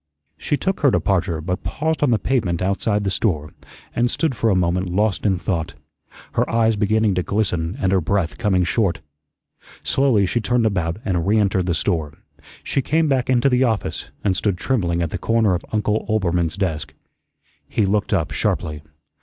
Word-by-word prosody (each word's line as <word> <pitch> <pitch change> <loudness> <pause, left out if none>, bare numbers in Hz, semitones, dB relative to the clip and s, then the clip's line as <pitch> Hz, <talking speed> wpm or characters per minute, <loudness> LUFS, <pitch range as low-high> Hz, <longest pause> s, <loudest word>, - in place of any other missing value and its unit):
She 145 - -1
took 190 +4 -1
her 145 - +4
departure, 90 -8 0
but 90 +3 -3
paused 160 +1 -2
on 145 - +3
the 115 - +3
pavement 105 -10 0
outside 100 +2 0
the 100 - -1
store, 80 -8 -1 0.4
and 120 +1 +2
stood 160 +2 0
for 115 -1 0
a 100 - +3
moment 90 +1 0
lost 105 +3 +1
in 95 -2 +2
thought, 85 -3 -3 0.6
her - - 0
eyes 115 -1 +2
beginning 110 0 +2
to 90 - 0
glisten 90 -2 -1
and 95 - +1
her 95 -1 +3
breath 85 0 -1
coming 95 -5 +2
short. 95 +1 0 0.8
Slowly 130 -7 +2
she 120 +6 0
turned 120 +2 +1
about 90 -5 0
and 90 -4 0
reentered 100 -3 +2
the 85 - +1
store; 80 -4 -1 0.5
she 135 - 0
came 160 +4 +1
back 130 -3 0
into 125 0 +3
the 125 -1 +3
office, 115 -4 -1
and 95 -2 +1
stood 100 -1 0
trembling 90 -7 0
at 80 - -3
the - - -3
corner 115 -4 +2
of 90 - -2
Uncle 105 0 0
Oelbermann's 90 -5 0
desk. 80 -7 -2 0.7
He 105 - +1
looked 100 +1 0
up 95 -6 0
sharply. 75 -2 -1
100 Hz, 180 wpm, -21 LUFS, 90-115 Hz, 0.8 s, her